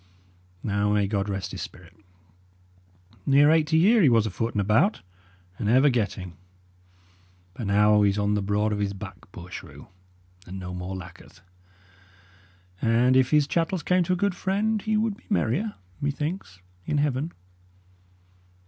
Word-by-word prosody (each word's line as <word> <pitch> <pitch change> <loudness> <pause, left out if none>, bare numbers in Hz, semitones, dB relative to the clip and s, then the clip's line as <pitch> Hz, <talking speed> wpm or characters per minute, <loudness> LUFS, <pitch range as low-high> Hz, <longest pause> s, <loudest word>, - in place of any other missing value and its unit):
Now 100 0 0
may 105 -1 +2
God 100 0 -2
rest 95 -1 -4
his - - -6
spirit! - - -10 1.3
Near 145 +2 +6
eighty 160 0 +3
year 210 +7 +5
he 150 - +6
was 115 -2 +3
afoot 115 +3 -3
and - - +1
about, 110 - +2 0.6
and 105 - -1
ever 130 +4 +5
getting; 100 -6 -2 1.2
but 110 +2 -5
now 105 +1 +4
he's 100 0 +2
on 105 0 +1
the 105 - 0
broad 105 +2 0
of 105 - -2
his 100 -1 -1
back, 95 -1 -10
poor 90 0 -11
shrew, - - -10 0.6
and 95 +1 -7
no 90 -1 -6
more 90 +1 -5
lacketh; 90 -1 -12 1.4
and 120 +3 +3
if 130 -1 +4
his 150 -2 +4
chattels 165 +2 -1
came 180 0 +2
to 185 - +1
a - - 0
good 200 +1 +1
friend, 205 +4 -1
he 215 0 0
would 215 -1 0
be - - -24
merrier, 200 - 0 0.3
methinks, 145 - -4 0.3
in 150 - 0
heaven." 145 +2 0
115 Hz, 155 wpm, -25 LUFS, 100-160 Hz, 1.4 s, Near